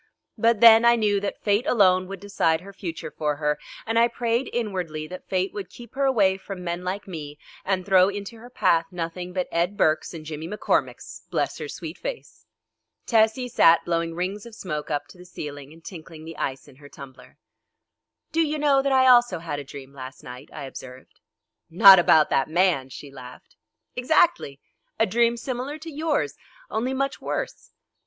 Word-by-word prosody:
But 230 -1 +2
then 230 -1 +9
I 235 0 +6
knew 210 -3 +1
that 200 0 -5
fate 210 +6 +1
alone 185 -7 +3
would 195 0 -7
decide 165 -5 0
her 200 +2 -12
future 170 -5 -6
for 150 -1 -2
her, 150 0 -1 0.3
and 225 +1 +1
I 235 - +5
prayed 240 +1 -1
inwardly 180 -9 -3
that 180 +4 -10
fate 185 0 -1
would 195 -4 -6
keep 235 +3 -13
her 275 +1 0
away 200 -8 +3
from 195 -1 -8
men 175 0 -4
like 190 +3 -4
me 150 -5 -7 0.3
and 185 -2 -1
throw 190 -1 +5
into 205 +3 -7
her 240 +2 -13
path 165 -8 +2
nothing 175 0 -5
but 180 0 -2
Ed 175 +4 0
Burkes 155 -5 +1
and 160 -2 -9
Jimmy 155 +1 -6
McCormicks, 210 +4 -2
bless - - -2
her - - -5
sweet - - -8
face! - - -8 0.6
Tessie 225 +2 +2
sat 170 -8 +4
blowing 165 -1 -1
rings 195 +5 -4
of 230 - -12
smoke 155 -8 -5
up 145 -1 -2
to 180 - -16
the - - -11
ceiling 145 -5 -8
and 165 +1 -17
tinkling 160 -3 -10
the 165 0 -8
ice 135 +1 -4
in 135 -3 -17
her 145 0 -14
tumbler. 135 -2 -13 0.9
"Do 330 - +1
you 305 -1 0
know 285 -2 +3
that 275 0 -1
I 260 -1 +4
also 240 -6 +5
had 160 -3 -5
a - - -6
dream 135 0 -11
last 130 -1 -10
night?" 125 0 -10
I 150 - -8
observed. 130 -1 -11 0.5
"Not 190 +2 +9
about 160 -3 +4
that 135 - +1
man," 165 -6 +1
she 140 +1 -10
laughed. 125 -2 -13 0.4
"Exactly. 250 - +2 0.4
A 225 - +5
dream 235 +1 +2
similar 255 +4 -4
to 320 +1 -9
yours, 305 0 -1 0.4
only 250 +4 -1
much 275 0 -2
worse." - - -4
185 Hz, 190 wpm, -24 LUFS, 160-235 Hz, 0.9 s, then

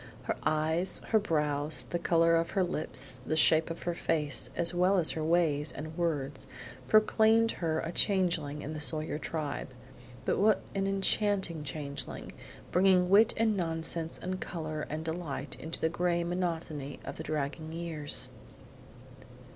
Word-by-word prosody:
Her - - -2
eyes, 160 +4 0
her 220 - +4
brows, 150 -5 +1
the 175 - -3
color 165 -1 +3
of 165 0 +1
her 190 - +4
lips, 140 -7 -1
the 155 - -1
shape 160 +1 +4
of 165 - -6
her 175 - -1
face, 150 -8 +1
as 170 +1 +2
well 180 +3 +3
as 170 -3 +4
her 160 - -3
ways 155 -3 +1
and 155 +2 -7
words, 150 -6 -2 0.4
proclaimed 220 +1 +4
her 160 -2 -1
a 165 - -4
changeling 175 -7 0
in 155 - -5
the 155 - -5
Sawyer 155 0 0
tribe; 155 -3 -4 0.6
but - - +1
what 210 +1 +3
an 195 0 -1
enchanting 195 -4 +1
changeling; 140 0 -6 0.4
bringing 180 0 +4
wit 215 +3 +6
and 220 -1 +2
nonsense 165 -2 +1
and 185 +1 -5
color 155 -3 -4
and 155 +2 -4
delight 160 -4 -4
into 160 +5 -2
the - - +2
gray 170 +1 0
monotony 165 -5 -3
of - - -6
the 160 - -5
dragging 155 +1 -3
years! 165 -3 -2
165 Hz, 155 wpm, -30 LUFS, 155-180 Hz, 0.6 s, wit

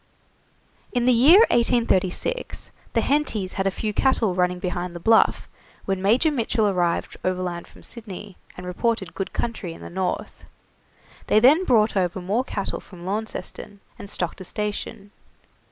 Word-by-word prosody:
In 245 -2 +1
the 250 - +5
year 295 - +7
1836, 235 - 0 0.2
the - - +2
Hentys 230 -10 0
had 195 0 -1
a - - +4
few 210 +2 -3
cattle 230 -5 +2
running 180 0 +1
behind 180 -1 -4
the - - -5
Bluff 220 +6 +3 0.4
when 195 -1 -1
Major 240 - +3
Mitchell 230 -5 +1
arrived 175 -3 0
overland 180 -2 -2
from - - -17
Sydney, 210 -4 -9 0.2
and 180 - -8
reported 190 0 -1
good 195 - -4
country 215 -7 -3
to - - -13
the - - -9
north. 185 0 -3 0.8
They 215 - +5
then 295 +11 +5
brought 220 -6 +3
over 185 -1 0
more 200 +7 0
cattle 200 -6 -3
from 175 -3 -13
Launceston, 205 0 -5 0.2
and 200 - -7
stocked 175 -2 -2
a - - -5
station. 205 0 -5
200 Hz, 155 wpm, -24 LUFS, 180-235 Hz, 0.8 s, year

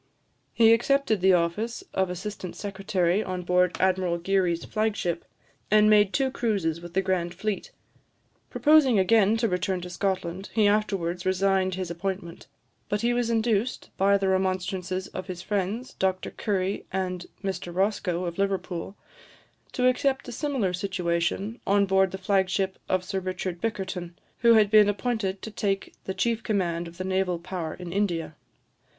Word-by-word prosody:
He 225 -1 +6
accepted 240 -3 +2
the 190 0 +5
office 195 - 0
of 190 -1 +1
assistant 185 0 -6
secretary 195 -1 0
on 185 -1 -4
board 180 0 +2
Admiral 185 -2 +2
Geary's 175 -1 0
flag 215 0 0
ship, 175 -4 -2 0.5
and 215 0 +5
made 205 -2 +5
two 265 +1 +1
cruises 195 -10 -1
with 175 0 -10
the 190 - +2
grand 180 -2 -1
fleet. 200 +2 -3 0.8
Proposing 295 -6 +5
again 205 +2 +4
to 230 0 +1
return 185 0 -1
to 180 0 -7
Scotland, 190 0 -2
he 215 -2 +4
afterwards 195 -4 0
resigned 190 0 +1
his 185 -2 -4
appointment; 170 -1 -5 0.4
but 205 0 0
he 240 +1 +2
was 240 -1 0
induced, 225 0 0
by 200 +1 +4
the 195 -1 -1
remonstrances 185 0 -1
of 185 - -6
his 180 -1 -6
friends, 205 +5 -2
Dr 190 -1 -1
Currie, 195 -2 -2
and 185 -2 -3 0.2
Mr 190 -2 -3
Roscoe, 185 -1 0
of 170 +1 -5
Liverpool, 195 -2 -2 0.8
to 250 0 +2
accept 265 +2 +1
a - - -5
similar 255 -8 -1
situation 185 +3 -1
on 200 0 +4
board 190 0 +3
the 190 - -6
flag 190 0 +1
ship 190 0 -1
of 185 -1 +1
Sir 195 0 -2
Richard 185 -1 -4
Bickerton, 190 -5 -3 0.2
who 235 -1 +6
had 210 -2 +4
been 210 -1 +7
appointed 205 -2 -2
to 220 - -6
take 195 -2 -2
the 190 - -3
chief 230 +4 0
command 175 -6 -1
of 170 0 -12
the 185 - -3
naval 185 -1 0
power 170 -2 -5
in 175 -1 -7
India. 170 -6 -1
190 Hz, 160 wpm, -26 LUFS, 180-210 Hz, 0.8 s, been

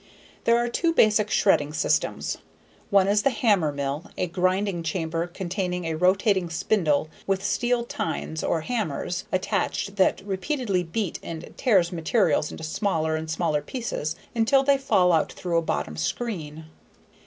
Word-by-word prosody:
There 235 0 +5
are 240 0 +1
two 330 +7 +1
basic 215 -6 +4
shredding 150 -9 +2
systems. 160 - 0 0.5
One 200 -3 +4
is 205 +1 +3
the 275 - +3
hammermill 155 - 0
a - - +1
grinding 185 +1 0
chamber 165 0 -2
containing 180 0 -3
a 165 - -1
rotating 185 +2 +2
spindle 160 -3 +1 0.2
with 195 0 0
steel 240 +2 +1
tines 160 -7 -4
or 165 - 0
hammers 180 - -3
attached 195 +2 -1
that 190 0 +2
repeatedly 200 0 -1
beats 180 +3 -3
and 165 -1 -8
tears 190 -9 +3
materials 165 -2 +1
into - - -8
smaller 160 -2 0
and 160 0 -4
smaller 160 -2 0
pieces 230 - -4 0.2
until 240 +4 +3
they 275 0 +3
fall 180 -10 +3
out 160 - +2
through 175 -2 -1
a - - -2
bottom 115 - -2
screen. 160 - -4
185 Hz, 145 wpm, -25 LUFS, 160-210 Hz, 0.5 s, There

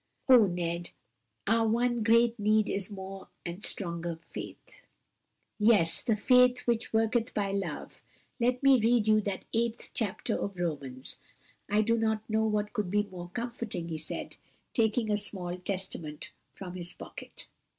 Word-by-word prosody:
Oh, 245 -6 +8
Ned, 175 -1 -2 0.6
our 225 +1 +3
one 240 +1 +1
great 230 +1 +4
need 215 0 +3
is 195 -1 -2
more 195 -1 -8 0.2
and 175 +4 -5
stronger 170 -3 0
faith!" - - -9 0.7
"Yes, 210 -6 +4
the 225 - +1
faith 250 +3 +5
which 235 -2 0
worketh 225 +2 +1
by 200 -2 0
love! 190 -6 -4 0.4
Let 250 +2 +1
me 270 -2 +7
read 230 0 +3
you 215 0 +5
that 200 -2 -4
eighth 235 +1 -1
chapter 210 -6 -1
of 200 - -3
Romans. 140 -7 -4 0.5
I 210 +1 +4
do 230 +1 +2
not 220 -1 0
know 220 0 +1
what 210 -1 -1
could 210 -6 -1
be 205 +2 +2
more 180 -3 -9
comforting," 230 -7 -4
he 160 -1 -3
said, 155 - -5 0.4
taking 220 -1 +2
a 210 - +3
small 185 -4 -3
Testament 180 -5 -5 0.2
from 180 -2 -7
his 175 -1 -4
pocket. - - -10
210 Hz, 150 wpm, -30 LUFS, 180-230 Hz, 0.7 s, Oh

